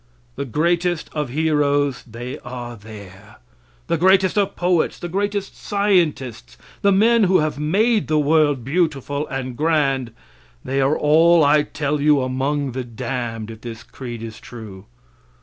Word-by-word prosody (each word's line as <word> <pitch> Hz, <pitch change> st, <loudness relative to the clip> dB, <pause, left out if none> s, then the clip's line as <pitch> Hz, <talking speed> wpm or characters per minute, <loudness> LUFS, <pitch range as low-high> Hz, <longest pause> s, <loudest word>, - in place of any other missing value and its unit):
The -, -, -4 dB
greatest 170 Hz, +5 st, 0 dB
of 150 Hz, -4 st, -2 dB
heroes, 145 Hz, -2 st, +1 dB
they 120 Hz, +3 st, -7 dB
are 120 Hz, -1 st, -7 dB
there. 105 Hz, -2 st, -13 dB, 0.5 s
The 170 Hz, -, -1 dB
greatest 190 Hz, +1 st, +4 dB
of 200 Hz, -2 st, +1 dB
poets, 175 Hz, -2 st, +1 dB
the 175 Hz, -, -6 dB
greatest 200 Hz, +2 st, -2 dB
scientists, 155 Hz, -, 0 dB, 0.2 s
the 200 Hz, -, +4 dB
men 220 Hz, +3 st, +4 dB
who 185 Hz, 0 st, +4 dB
have 155 Hz, -1 st, -1 dB
made 210 Hz, +8 st, +2 dB
the 155 Hz, -, +1 dB
world 150 Hz, -3 st, +2 dB
beautiful 145 Hz, -2 st, -1 dB
and 130 Hz, -3 st, -4 dB
grand, 140 Hz, -5 st, +1 dB, 0.5 s
they 135 Hz, +1 st, 0 dB
are 135 Hz, +3 st, +2 dB
all, 165 Hz, +2 st, +5 dB
I 145 Hz, +1 st, +5 dB
tell 145 Hz, 0 st, -2 dB
you, 145 Hz, -2 st, +4 dB
among 135 Hz, +2 st, -1 dB
the 130 Hz, +1 st, -4 dB
damned, 115 Hz, -1 st, -5 dB
if 110 Hz, 0 st, -12 dB
this 115 Hz, -1 st, -8 dB
creed 120 Hz, -3 st, -8 dB
is 110 Hz, -1 st, -8 dB
true. 105 Hz, -6 st, -11 dB
145 Hz, 150 wpm, -21 LUFS, 125-170 Hz, 0.5 s, all